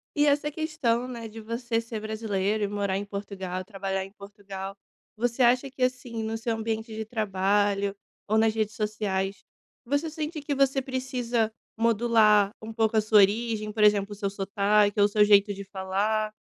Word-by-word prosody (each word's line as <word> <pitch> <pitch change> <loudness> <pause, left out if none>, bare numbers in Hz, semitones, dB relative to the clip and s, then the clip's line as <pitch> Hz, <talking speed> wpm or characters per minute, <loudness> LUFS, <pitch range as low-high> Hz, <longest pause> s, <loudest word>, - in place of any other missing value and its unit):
E 295 - +4
essa 295 +1 +2
questão, 285 -7 -1
né, 235 -3 -6
de 220 +1 -10
você 230 +1 -2
ser 230 -1 -6
brasileiro 215 -1 -1
e 205 - +1
morar 200 -2 -1
em 200 - -4
Portugal, 195 -2 -5
trabalhar 195 -1 -3
em 195 - -13
Portugal, 200 -1 -8 0.4
você 240 +2 0
acha 250 +3 +3
que 260 0 -12
assim, 250 -3 -2
no 220 +1 -2
seu 225 0 -2
ambiente 220 0 -3
de 220 0 -4
trabalho 200 -2 0 0.3
ou 215 +1 +2
nas 220 0 +3
redes 215 -1 -1
sociais, 200 -2 -2 0.4
você 285 +6 0
sente 310 0 -4
que 285 0 -2
você 270 0 +2
precisa 250 -4 -1 0.3
modular 220 -3 +4
um 220 +1 -7
pouco 220 0 +1
a - - +5
sua 215 0 +5
origem? 215 +1 +2
Por 210 0 0
exemplo, 205 -1 +4
o - - -8
seu 200 -1 -2
sotaque 205 +1 +1
ou 205 - +7
o - - +4
seu 210 0 +4
jeito 205 0 +5
de 200 0 -7
falar, 200 +3 -1
215 Hz, 180 wpm, -27 LUFS, 200-235 Hz, 0.4 s, ou